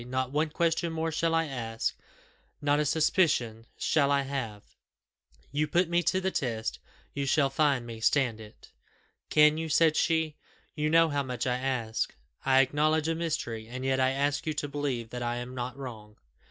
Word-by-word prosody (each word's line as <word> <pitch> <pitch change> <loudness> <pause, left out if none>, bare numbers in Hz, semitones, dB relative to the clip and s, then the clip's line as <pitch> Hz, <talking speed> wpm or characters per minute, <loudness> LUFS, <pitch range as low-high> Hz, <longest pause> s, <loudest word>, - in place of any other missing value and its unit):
Not 130 0 -2
one 155 +2 +1
question 165 +1 0
more 160 0 -1
shall 165 +1 +1
I 165 0 +2
ask 115 -5 -3 0.7
not 145 0 +2
a 150 - +1
suspicion 130 -8 +1
shall 145 -3 +2
I 140 -1 +3
have: 130 -7 -4 0.9
you 150 +2 0
put 175 +3 +2
me 175 0 +2
to 185 +2 +1
the 190 0 -1
test, 115 -7 -2 0.3
you 140 -1 -2
shall 135 -1 +3
find 135 -4 +2
me 115 -1 -8
stand 120 -1 +2
it." 105 -1 -15 0.6
"Can 150 0 +5
you?" 160 0 -3
said 160 0 +4
she; 160 -2 +1 0.4
"you 150 0 -1
know 165 +1 +5
how 145 -1 0
much 125 -2 -3
I 125 -1 +1
ask. 125 -4 -2 0.3
I 135 0 +5
acknowledge 155 +4 +1
a - - +2
mystery, 150 -9 -3
and 130 +2 -6
yet 135 0 +1
I 130 0 +4
ask 145 +3 -1
you 155 - 0
to 150 -1 -2
believe 135 -5 -3
that 125 - -5
I 120 0 -1
am 120 +1 -6
not 125 +1 -5
wrong." 110 -6 -9
140 Hz, 185 wpm, -29 LUFS, 125-155 Hz, 0.9 s, Can